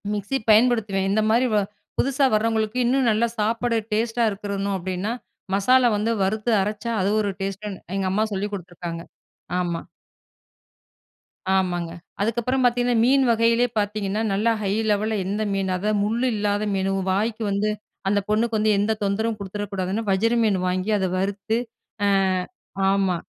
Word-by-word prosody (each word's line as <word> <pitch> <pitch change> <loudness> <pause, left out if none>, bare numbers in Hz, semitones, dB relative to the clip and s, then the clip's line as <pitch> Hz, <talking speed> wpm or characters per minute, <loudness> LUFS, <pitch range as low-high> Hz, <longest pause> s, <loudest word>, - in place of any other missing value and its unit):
Mixie 210 +6 -1
பயன்படுத்துவேன். 215 -4 +3
இந்த 215 +2 +2
மாரி 240 +3 +3
வ - - +4 0.4
புதுசா 275 +1 +2
வர்றவங்களுக்கு 220 +1 +1
இன்னும் 260 +1 +2
நல்ல 215 +2 +1
சாப்பிட 230 +2 0 0.2
டேஸ்ட்டா 230 +2 +1
இருக்கணும் 200 -1 -3
அப்படீன்னா, 185 +3 -3 0.4
மசாலா 250 +5 +4
வந்து 215 +3 0
வறுத்து 215 +4 0
அரைச்சா 210 +3 -3
அது 190 - +1
ஒரு 205 -1 -1
டேஸ்ட்டுன்னு, 195 0 -4
எங்க 195 -1 0
அம்மா 215 +3 +2
சொல்லிக் 205 +2 -3
குடுத்துருக்காங்க. 175 -3 -6 0.6
ஆமா. 170 -2 -2 1.7
ஆமாங்க. 175 -3 0 0.3
அதுக்கப்பறம் 240 +4 0
பாத்தீங்கன்னா, 245 0 +2
மீன் 270 +2 +4
வகையிலே 230 +1 +3
பாத்தீங்கன்னா, 205 0 -1
நல்லா 215 +4 +2
ஹை 195 - 0 0.2
லெவல்ல 215 +2 0
எந்த 205 +3 -1
மீனு? 195 -1 -1
அதாவது 210 +2 0
முள்ளு 230 +4 0
இல்லாத 205 0 0
மீனு, 195 0 0 0.2
வாய்க்கு 220 +3 -1
வந்து 200 +2 +1 0.4
அந்த 205 +1 +3
பொண்ணுக்கு 220 +1 +1
வந்து 215 0 +2
எந்த 205 +2 +1
தொந்தரவும் 215 +3 0
குடுத்துற 200 +1 -5
கூடாதுன்னு, 195 +3 -2
வஜிர 220 +5 +2
மீன் 205 -4 +2
வாங்கி, 185 +3 -1
அத 190 - +1
வறுத்து 200 +3 -1 0.5
அ - - +3 0.8
ஆமா. 195 -2 +2
210 Hz, 145 wpm, -23 LUFS, 195-230 Hz, 1.7 s, வ